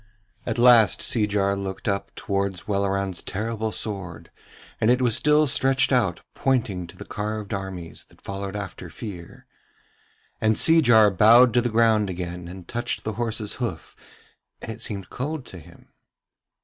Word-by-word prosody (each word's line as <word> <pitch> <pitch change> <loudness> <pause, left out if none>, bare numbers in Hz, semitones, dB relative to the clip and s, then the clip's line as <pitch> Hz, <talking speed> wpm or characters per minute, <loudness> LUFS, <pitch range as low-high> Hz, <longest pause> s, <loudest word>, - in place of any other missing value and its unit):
At - - -2
last 120 -4 +6
Seejar 100 -3 +1
looked 100 +2 -6
up 100 -1 -1
towards 100 -2 -3
Welleran's 100 -2 -1
terrible 110 +1 -3
sword, 95 -7 -6 0.5
and 110 - +2
it 125 +1 +4
was 120 -4 +3
still 150 +1 +4
stretched 135 0 +2
out 115 -10 +1
pointing 110 -10 -1
to 85 - -15
the - - -9
carved 105 0 -4
armies 95 -4 -6
that - - -24
followed 100 0 -5
after 100 -3 -7
Fear. 90 -4 -9 1.0
And 110 0 +2
Seejar 120 -10 +5
bowed 115 +5 +6
to 120 - +4
the 120 - -1
ground 110 -2 +2
again 90 -1 -6
and 90 0 -10
touched 120 +1 -3
the 110 - -3
horse's 110 -1 -2
hoof, 95 -10 -5 0.6
and - - -7
it - - -9
seemed 100 -4 -5
cold 145 +1 -4
to 90 - -11
him. 85 +2 -18
105 Hz, 150 wpm, -24 LUFS, 95-120 Hz, 1.0 s, last